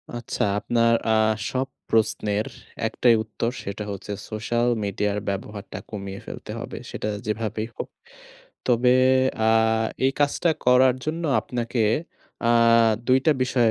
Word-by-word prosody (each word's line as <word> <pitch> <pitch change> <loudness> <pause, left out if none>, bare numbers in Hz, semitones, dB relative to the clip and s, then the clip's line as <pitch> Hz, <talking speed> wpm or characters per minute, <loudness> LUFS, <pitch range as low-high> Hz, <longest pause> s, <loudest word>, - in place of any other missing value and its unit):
আচ্ছা 120 -1 -3 0.2
আপনার 115 +1 +2 0.2
আ - - +4 0.4
সব 130 +1 -1 0.2
প্রশ্নের 105 -1 +1 0.4
একটাই 120 -2 +3
উত্তর 110 +2 -3
সেটা 100 +2 -5
হচ্ছে 100 +1 -7 0.2
সোশ্যাল 120 +2 -1 0.2
মিডিয়ার 100 +1 -1
ব্যবহারটা 100 +1 -5
কমিয়ে 100 -2 -6
ফেলতে - - -8
হবে। - - -7
সেটা - - -4 0.2
যেভাবেই 110 0 -2
হোক। - - -5 0.8
তবে 125 0 +4 0.5
আ - - +5 0.6
এই 135 - +2
কাজটা 145 +4 +2 0.2
করার 125 0 +6
জন্য 165 +2 -3 0.2
আপনাকে 120 -1 -2 0.7
আ - - +5 0.6
২ 130 +1 +5
টা 155 - +6
বিষয় 125 -3 +2
115 Hz, 125 wpm, -24 LUFS, 105-125 Hz, 0.8 s, করার